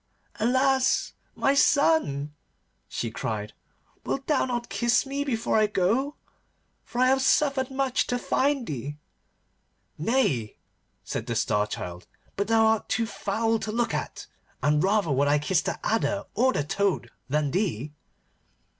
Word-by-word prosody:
'Alas! 260 Hz, +3 st, +2 dB, 0.2 s
my 275 Hz, -, +2 dB
son,' 280 Hz, -, +2 dB, 0.5 s
she 115 Hz, -, -4 dB
cried, 105 Hz, -1 st, -4 dB, 0.5 s
'wilt 270 Hz, 0 st, -3 dB
thou 300 Hz, -, +2 dB
not 240 Hz, -2 st, -3 dB
kiss 235 Hz, +7 st, +1 dB
me 280 Hz, +1 st, -2 dB
before 230 Hz, -5 st, 0 dB
I 215 Hz, -, +4 dB
go? 220 Hz, +9 st, 0 dB, 0.7 s
For 240 Hz, -, -6 dB
I -, -, +6 dB
have 265 Hz, 0 st, +3 dB
suffered 275 Hz, -1 st, +2 dB
much 265 Hz, -1 st, 0 dB
to 245 Hz, -, 0 dB
find 275 Hz, +1 st, 0 dB
thee.' 145 Hz, -, -5 dB, 1.0 s
'Nay,' 155 Hz, -, 0 dB, 0.5 s
said 110 Hz, -, -4 dB
the 115 Hz, -, -2 dB
Star 105 Hz, -1 st, +1 dB
Child, 90 Hz, -2 st, -6 dB, 0.3 s
'but 200 Hz, 0 st, -1 dB
thou 225 Hz, 0 st, +4 dB
art 220 Hz, -1 st, +1 dB
too 230 Hz, +3 st, +1 dB
foul 225 Hz, +1 st, -1 dB
to 215 Hz, -, -4 dB
look 235 Hz, +2 st, 0 dB
at, -, -, -4 dB, 0.4 s
and 150 Hz, +1 st, +3 dB
rather 195 Hz, -4 st, +2 dB
would 140 Hz, +1 st, +2 dB
I 145 Hz, +1 st, +4 dB
kiss 160 Hz, +4 st, +1 dB
the -, -, -3 dB
adder 215 Hz, -2 st, 0 dB
or 255 Hz, +4 st, +3 dB
the 145 Hz, -, -1 dB
toad 195 Hz, +5 st, -1 dB, 0.2 s
than 150 Hz, 0 st, 0 dB
thee. 155 Hz, -, -1 dB
220 Hz, 145 wpm, -26 LUFS, -, 1.0 s, I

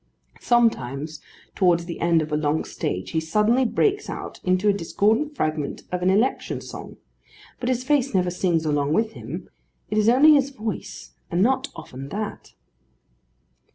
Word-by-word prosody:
Sometimes, 155 Hz, -, +1 dB, 0.3 s
towards 175 Hz, -3 st, +2 dB
the 170 Hz, -, -6 dB
end 170 Hz, -2 st, +3 dB
of 155 Hz, -, -8 dB
a -, -, +1 dB
long 150 Hz, +1 st, 0 dB
stage, 90 Hz, +1 st, -4 dB
he 160 Hz, -, +1 dB
suddenly 210 Hz, +10 st, +2 dB
breaks 410 Hz, -, +1 dB
out -, -, -6 dB
into 185 Hz, +2 st, +1 dB
a 205 Hz, -, +5 dB
discordant 220 Hz, -, +1 dB
fragment 155 Hz, -, -2 dB
of 180 Hz, 0 st, -2 dB
an 180 Hz, -, +2 dB
election 215 Hz, +7 st, +1 dB
song, -, -, -9 dB, 0.6 s
but 245 Hz, -, -2 dB
his 250 Hz, -1 st, 0 dB
face 275 Hz, -1 st, +2 dB
never 180 Hz, -2 st, +1 dB
sings 175 Hz, -3 st, 0 dB
along 145 Hz, -1 st, +1 dB
with 220 Hz, +4 st, +1 dB
him: 130 Hz, +8 st, -7 dB, 0.4 s
it 215 Hz, -, +2 dB
is 215 Hz, +1 st, +4 dB
only 285 Hz, +6 st, +7 dB
his 280 Hz, -2 st, +3 dB
voice, 220 Hz, -6 st, -6 dB, 0.2 s
and 175 Hz, +2 st, +2 dB
not 265 Hz, +3 st, +2 dB
often 135 Hz, +2 st, -9 dB
that. 210 Hz, +4 st, -5 dB
185 Hz, 160 wpm, -24 LUFS, 160-240 Hz, 0.6 s, only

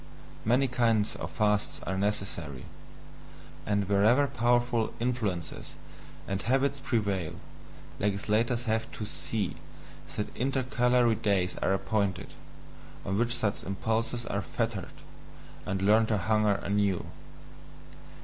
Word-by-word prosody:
Many 125 Hz, +5 st, +3 dB
kinds 115 Hz, -4 st, +2 dB
of -, -, -5 dB
fasts 105 Hz, -2 st, +1 dB
are 95 Hz, -, -1 dB
necessary; 95 Hz, -9 st, -2 dB, 1.0 s
and 100 Hz, -2 st, +1 dB
wherever 110 Hz, +8 st, +4 dB
powerful 120 Hz, -3 st, +1 dB
influences 110 Hz, -9 st, -2 dB, 0.5 s
and 95 Hz, 0 st, -2 dB
habits 135 Hz, +3 st, +1 dB
prevail, 100 Hz, -, -1 dB, 0.6 s
legislators 105 Hz, +4 st, +1 dB
have 110 Hz, -1 st, -1 dB
to 105 Hz, -, -4 dB
see 105 Hz, -2 st, -3 dB, 0.6 s
that 105 Hz, -, -4 dB
intercalary 125 Hz, -2 st, +2 dB
days 100 Hz, -4 st, +1 dB
are 95 Hz, -, +2 dB
appointed, 100 Hz, -2 st, -1 dB, 0.7 s
on 95 Hz, +1 st, 0 dB
which 120 Hz, +1 st, +2 dB
such 110 Hz, -4 st, -1 dB
impulses 115 Hz, +4 st, -1 dB
are 100 Hz, -, -1 dB
fettered, 115 Hz, -3 st, -3 dB, 0.7 s
and 95 Hz, -2 st, -1 dB
learn 110 Hz, +3 st, +5 dB
to 110 Hz, -, +1 dB
hunger 105 Hz, +2 st, +2 dB
anew. 100 Hz, -2 st, 0 dB
110 Hz, 110 wpm, -29 LUFS, 100-120 Hz, 1.0 s, learn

